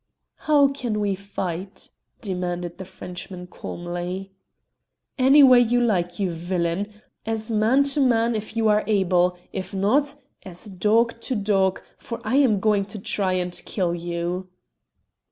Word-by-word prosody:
"How 290 -2 +6
can 245 -6 -3
we 205 -1 0
fight?" 190 -1 -6 0.3
demanded 180 -3 -4
the 190 - -6
Frenchman 180 0 -8
calmly. 175 +2 -6 0.9
"Any 270 +3 +7
way 255 -2 +8
you 245 0 +3
like, 180 -7 0
you 190 -3 0
villain. 175 +3 -2 0.3
As 225 0 -2
man 225 +6 +3
to 280 +1 +1
man 235 -2 +3
if 215 +1 -5
you 225 -1 +2
are 210 0 +3
able. 180 -3 +2 0.2
If 190 +1 -5
not, 275 +9 +2 0.3
as 180 +1 -9
dog 220 +4 +1
to 260 - -2
dog, 195 -3 +1 0.2
for 235 - -6
I 240 +5 +1
am 245 -8 +4
going 205 -1 +2
to 205 +2 -8
try 190 -1 -1
and 180 -1 -1
kill 180 -4 -1
you!" 175 +2 -3
200 Hz, 145 wpm, -23 LUFS, 180-225 Hz, 0.9 s, way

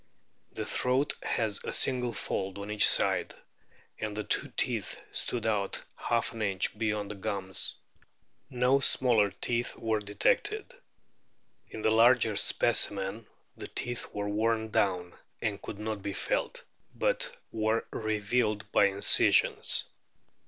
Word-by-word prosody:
The - - -3
throat 130 +3 +1
has 110 -3 -1
a - - -3
single 125 -2 +2
fold 95 -3 -3
on 100 +1 -6
each 105 - +4
side, - - +1 0.6
and 105 -1 -4
the 105 - -2
two - - -1
teeth - - 0
stood 120 -3 -1
out 105 -3 0 0.2
half 120 -1 -1
an 115 - -6
inch 100 -1 0
beyond 105 -2 -1
the - - -6
gums. 100 -2 -2 0.7
No 125 +1 +3
smaller 120 -6 +3
teeth 120 +5 -2
were 110 -1 0
detected. 405 - 0 1.0
In 110 - -7
the 110 - +3
larger 115 -1 +5
specimen 100 +2 +1 0.3
the - - -7
teeth 120 0 -4
were 100 0 -3
worn 110 +1 0
down, 90 -4 0 0.3
and 105 -2 -2
could 100 - -7
not 105 -1 -4
be 100 0 -4
felt, - - -2 0.3
but - - 0
were 110 +1 0
revealed 110 0 -1
by - - +5
incisions. 100 0 +3
110 Hz, 130 wpm, -30 LUFS, 100-120 Hz, 1.0 s, larger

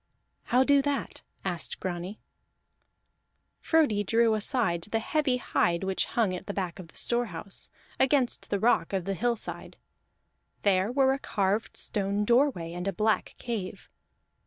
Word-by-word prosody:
"How 250 +2 +4
do 280 +1 +5
that?" 285 0 -2 0.2
asked 180 -3 -3
Grani. 185 +3 -4 1.4
Frodi 290 -11 +2
drew 225 +2 +3
aside 215 - 0
the 225 - +2
heavy 265 +3 +1
hide 175 -7 +1
which 190 0 0
hung 220 -6 0
at 180 - -6
the 200 - -4
back 185 -3 -3
of 180 - -8
the - - -20
storehouse, 210 -6 -1 0.3
against 265 -2 +2
the 200 - 0
rock 230 -1 +2
of 190 -3 -1
the 195 - -1
hillside; 235 +3 -2 0.9
there 195 +1 +3
were 265 0 +4
a 275 - -3
carved 205 -2 -1
stone 205 0 -1
doorway 235 - +2
and 180 +2 -4
a - - +1
black 215 +4 0
cave. 225 -6 -5
210 Hz, 145 wpm, -28 LUFS, 190-245 Hz, 1.4 s, do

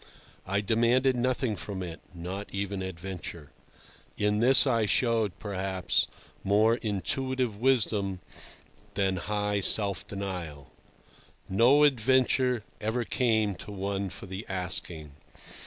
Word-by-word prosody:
I 100 +2 +1
demanded 120 +5 +2
nothing 125 -2 0
from 95 -2 -5
it—not 90 +3 -7
even 100 0 -3
adventure. 90 -4 -7 0.7
In 105 0 +1
this 130 +5 +7
I 115 -5 +2
showed, 115 -4 +1
perhaps, 95 -3 0 0.4
more 110 +4 +3
intuitive 125 +3 -2
wisdom 105 -6 +1 0.8
than 95 -2 +1
high 105 +2 -1
self 100 -2 +1
denial. 90 -8 -6 0.8
No 125 +9 +5
adventure 130 -2 +3 0.2
ever 110 +3 -1
came 110 -5 +1
to 105 - -9
one 100 0 -3
for 90 - -9
the 95 +2 -6
asking. 90 -5 -4
100 Hz, 105 wpm, -28 LUFS, 95-120 Hz, 0.8 s, this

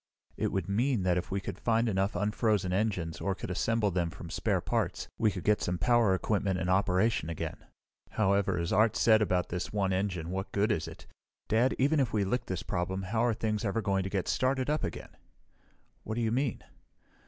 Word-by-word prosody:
"It - - -1
would 95 -3 -2
mean 115 +2 +1
that 90 -1 +2
if 90 - -7
we 100 - -1
could - - -6
find 115 0 +2
enough 95 -1 0
unfrozen 105 -2 +1
engines, 95 -5 -1
or 100 -1 0
could - - -6
assemble 110 +2 +1
them 85 -1 0
from - - -9
spare - - 0
parts, - - -2
we 110 -2 +4
could 95 -3 -5
get 105 0 +2
some 90 0 -1
power 120 -3 +3
equipment 100 -1 0
in 90 - -2
operation 95 -1 +2
again. 85 - -4 0.6
"However, 100 -2 +2
as 85 0 -1
Art 110 +1 +4
said 110 -1 +5
about 90 -4 +1
this 90 0 -3
one 100 -2 0
engine, 90 -3 -2
what 95 +1 -4
good 105 +3 +2
is 85 -6 -1
it? - - -11 0.4
Dad 120 +4 +2
even 145 +4 +3
if 130 -6 0
we 105 -2 +2
lick 120 +5 -1
this 95 -2 -3
problem, 95 +2 -2
how 110 +5 0
are 120 -2 +2
things 110 -1 -1
ever 105 +1 0
going 95 -1 +1
to 95 - -3
get 95 -2 -2
started 130 +2 +1
up 155 - 0
again?" - - -5 0.9
"What 110 - -5
do 120 - -1
you 110 -1 +1
mean?" 130 -1 -1
100 Hz, 210 wpm, -30 LUFS, 95-115 Hz, 0.9 s, said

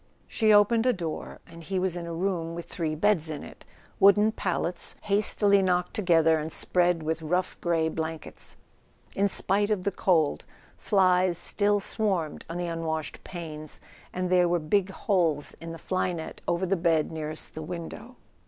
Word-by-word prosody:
She 220 -2 +2
opened 225 +3 +5
a 250 - +4
door, 170 -6 -6
and 165 0 -13
he 190 +4 -3
was 185 -1 0
in 170 -1 -5
a 170 - -5
room 170 -2 -2
with 170 - -6
three 160 -3 -3
beds 170 -2 +2
in 150 -2 -5
it, - - -12 0.4
wooden 205 +2 +6
pallets 180 -4 -2
hastily 200 -1 +3
knocked 180 -1 0
together 165 -6 +3
and 155 +1 -5
spread 175 -2 +1
with 160 +1 -2
rough 180 +4 -1
grey 165 -2 +1
blankets. 160 -1 -5 0.6
In 200 +1 +2
spite 200 +1 +1
of 205 -4 0
the 200 - 0
cold, 165 -5 +1 0.3
flies 185 -3 +2
still 205 +3 +3
swarmed 195 -6 -2
on 165 - -4
the 175 - -2
unwashed 165 -2 -4
panes, 155 -4 -6 0.3
and 185 0 -3
there 180 -1 +4
were 175 - +2
big 185 +4 +1
holes 170 -7 0
in 165 0 -6
the 165 - -7
fly 185 +2 -1
net 160 -2 -7
over 175 +2 0
the 190 +2 +1
bed 165 -3 +1
nearest 155 -1 -5
the 160 - -6
window. 175 +9 -7
175 Hz, 170 wpm, -27 LUFS, 160-195 Hz, 0.6 s, wooden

